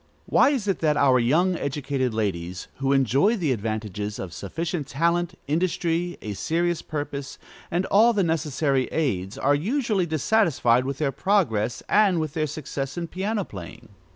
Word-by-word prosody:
_ - - -37 0.2
Why - - +4
is 260 -8 -1
it 195 - 0
that 150 -2 +2
our 135 -3 +4
young, 165 +10 +2
educated 140 -4 -2
ladies, 90 -5 -3
who 135 0 0
enjoy 135 - +3
the 160 -8 0
advantages 105 -2 -3
of 90 -3 -6
sufficient 160 - -4
talent, 170 +4 0
industry, 170 +2 0
a 105 - -4
serious 165 - 0
purpose, 145 -2 -5 0.3
and 175 +3 0
all 225 +4 +5
the 205 -4 +1
necessary 150 -4 0
aids, 100 - -2
are 145 - +2
usually 205 - 0
dissatisfied 155 - +2
with 135 0 -3
their 145 -2 0
progress 125 - 0
and 200 -5 +4
with 155 -2 -3
their 155 -1 0
success 140 -1 -5
in 170 -1 -3
piano 200 +4 -2
playing? 95 -4 -10
150 Hz, 160 wpm, -25 LUFS, 125-175 Hz, 0.3 s, all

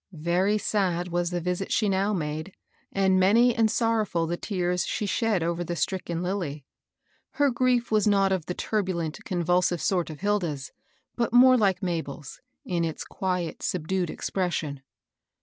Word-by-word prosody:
Very 175 +6 +1
sad 180 -4 0
was 175 0 0
the 175 0 -2
visit 180 +2 -3
she 215 - +2
now 195 +1 +1
made, 155 0 -3 0.4
and 190 -1 +3
many 230 +6 +5
and 225 -2 +2
sorrow&I 225 -1 +1 0.2
tfie 175 +1 -4
tears 180 -3 -1
she 210 - -2
shed 200 -1 +1
over 170 +1 -1
the 175 0 -4
stricken 170 +1 -2
Lilly. 170 -7 -3 0.7
Her 285 -2 +2
grief 245 -1 +1
was 215 0 +3
not 195 -2 +3
of 185 -5 -1
the 180 - -3
turbulent, 180 -7 -2
con 175 -2 -2
vulsive 175 0 +2
sort 180 -1 0
of 155 +1 -9
Hilda's, 170 -8 -1 0.4
but 235 -1 -1
more 255 +1 +8
like 200 -4 +2
Mabel's, 160 -5 -4 0.2
in 175 -2 -1
its 160 -1 -3
quiet, 180 -4 -3
subdued 180 0 -1
expression. 160 -8 -2
180 Hz, 160 wpm, -26 LUFS, 170-205 Hz, 0.7 s, more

